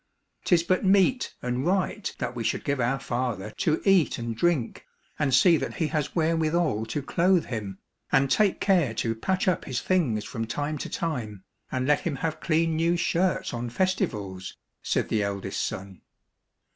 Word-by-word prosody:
" - - -40
'Tis 170 -2 +4
but 185 +3 +1
meet 200 +6 +3
and 125 +1 -1
right 190 +4 -1
that 125 -1 -4
we 120 - -3
should 110 - -1
give 140 -2 -1
our 125 +3 +1
father 120 -5 -3
to 155 +6 0
eat 195 -5 +4
and 115 -1 -4
drink, 155 -4 0 0.4
and 145 -3 +1
see 165 +6 +6
that - - -4
he 170 - 0
has 150 -3 -2
wherewithal 160 -7 +1
to 140 +5 -3
clothe 175 +5 +2
him, 105 -5 -5 0.3
and 135 0 +3
take 210 -3 +3
care 170 - +2
to 115 0 0
patch 185 - -1
up 180 -3 +1
his 130 -3 -2
things 130 - 0
from 115 0 -4
time 145 +5 -3
to - - -5
time, 115 - -4 0.3
and 130 -1 -1
let 145 +1 +3
him 160 -5 -3
have 160 +3 -3
clean 165 0 +1
new 170 +2 +2
shirts 175 +1 0
on 120 0 -3
festivals," 115 - -2 0.2
said - - 0
the 110 - +1
eldest 100 -1 -3
son. 95 -1 -6
145 Hz, 180 wpm, -26 LUFS, 115-175 Hz, 0.4 s, see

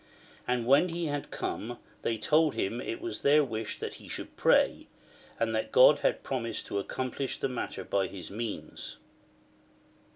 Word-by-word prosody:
And 125 -2 +1
when 140 +8 +5
he 170 0 -2
had 145 -1 -3
come 120 +3 -4 0.2
they 115 - 0
told 155 +6 +3
him 110 +5 -1
it 350 - -4
was 355 0 -4
their 150 +2 +5
wish 110 -4 -3
that - - -5
he - - -12
should - - -6
pray, - - +3 0.5
and 115 -1 +1
that 110 - -1
God 130 +4 +7
had - - +1
promised 120 -3 -2
to 100 - -2
accomplish 130 +5 -3
the - - 0
matter 125 -2 -4
by 95 -1 0
his 90 +1 -7
means. 110 +1 -5
125 Hz, 165 wpm, -30 LUFS, 110-145 Hz, 0.5 s, God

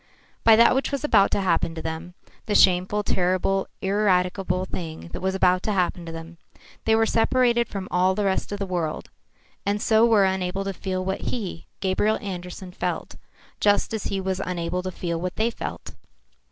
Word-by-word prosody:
By 225 - +8
that 235 +1 +6
which 265 +2 0
was 280 0 -2
about 210 -9 +4
to - - 0
happen 170 -3 +1
to 160 - -5
them, 165 +2 -5 0.3
the 210 - 0
shameful, 185 +3 +4
terrible, 185 +1 +1 0.2
ineradicable 185 -2 +1
thing 165 -3 -6
that - - -5
was 190 +1 0
to 185 +3 +2
happen 180 -3 -1
to - - -5
them, 165 +1 -9 0.5
they 220 - +4
were 225 0 +3
separated 235 +1 +2
from 195 -2 -5
all 185 +1 +3
the 210 - 0
rest 190 +1 0
of 205 - -2
the 200 - -3
world, 175 -4 -3 0.5
and 205 +1 0
so 220 +1 +3
were 220 -4 +5
unable 190 0 -1
to 195 0 -3
feel 185 0 -3
what 190 0 -2
he, 195 -8 -5
Gabriel 205 +3 +1
Andersen, 180 -1 -7
felt, - - -4 0.4
just 205 +1 +2
as 220 - -3
he 195 - -1
was 190 0 -2
unable 180 0 -2
to 185 - -4
feel 170 -2 -3
what 180 -1 -3
they 225 +2 +1
felt. - - -7
190 Hz, 185 wpm, -24 LUFS, 180-205 Hz, 0.5 s, By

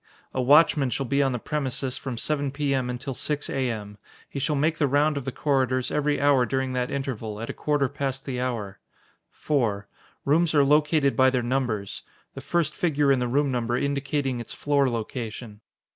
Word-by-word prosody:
A 130 - 0
watchman 145 +1 +5
shall 130 +3 -2
be 140 +3 +1
on 135 -1 +2
the 125 - -1
premises 135 -1 -2
from 130 -4 -5
7 145 +2 0
P.M. 135 -2 -1
until 130 +2 -4
6 145 +3 -2
A.M. 110 -6 -3 0.3
He 140 - -6
shall 150 +3 0
make 155 +3 +1
the 145 - +3
round 145 +3 +2
of 140 -3 -4
the 135 - -2
corridors 130 -3 0
every 150 0 +1
hour 140 -2 +4
during 130 -1 -1
that 125 -1 -1
interval, 115 -6 -4
at 115 - -4
a - - -9
quarter 145 -2 0
past 135 0 -4
the 125 -2 -3
hour. 115 -6 -3 0.5
4. 110 -9 -1 0.4
Rooms 160 +3 +3
are 145 - +6
located 150 0 +3
by 130 0 +5
their 130 -2 0
numbers: 120 -5 -2 0.3
the 135 - -8
first 155 +1 0
figure 150 -5 +2
in 135 - +3
the 125 - 0
room 140 +3 +1
number 120 -1 0
indicating 140 -2 -1
its 120 - -6
floor 140 -2 +2
location. 115 -2 -5
135 Hz, 190 wpm, -25 LUFS, 125-145 Hz, 0.5 s, are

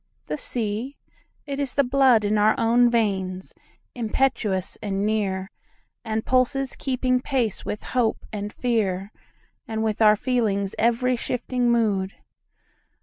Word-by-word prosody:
The - - -3
sea? 235 +1 -3 0.5
It 280 -1 -4
is 280 -3 -1
the 280 - +4
bloodIn 245 -6 +3
our 215 +1 +4
own 240 +1 +4
veins, 190 -5 -1 0.4
impetuous 220 -5 -1
and 200 -1 -1
near, 195 -3 -1 0.5
And 220 -1 -2
pulses 260 +1 +1
keeping 255 -1 0
pace 250 -7 -1
with 210 - -4
hope 240 -3 -1
and 205 0 -4
fearAnd 205 -6 -1 0.7
with 220 0 -1
our 210 -1 +7
feeling's 210 -5 0
every 240 +3 +2
shifting 245 +1 -1
mood. 205 -5 +1
225 Hz, 120 wpm, -24 LUFS, 205-250 Hz, 0.7 s, our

